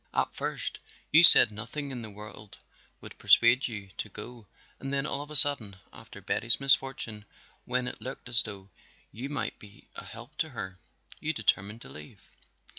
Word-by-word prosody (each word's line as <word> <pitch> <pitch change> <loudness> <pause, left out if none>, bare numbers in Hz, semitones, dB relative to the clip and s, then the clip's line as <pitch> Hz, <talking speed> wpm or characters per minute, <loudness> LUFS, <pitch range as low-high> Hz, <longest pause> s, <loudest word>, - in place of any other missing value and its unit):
At - - -1
first - - -5 0.3
you 155 - +7
said 165 -9 +10
nothing 120 +7 -8
in 125 -2 -8
the 110 - -10
world 105 0 -13 0.4
would - - -14
persuade 120 +3 +3
you 105 -5 -9
to 110 - -6
go 110 +2 -12 0.3
and 135 - -7
then 140 0 -3
all 145 - -5
of 145 - -11
a 150 - -9
sudden, 135 -9 +5 0.2
after 115 -3 -14
Betty's 115 +4 -1
misfortune, 135 -5 -1 0.4
when 125 0 -3
it - - -9
looked 130 -1 -9
as 120 -2 0
though 100 -2 -11 0.4
you 125 +6 -8
might 145 - -6
be 100 -1 -17
a - - -9
help 120 +6 -13
to 160 - -2
her, 95 -8 -9 0.4
you - - -4
determined 105 +4 -3
to - - -14
leave. 75 0 -16
115 Hz, 180 wpm, -27 LUFS, 105-135 Hz, 0.4 s, said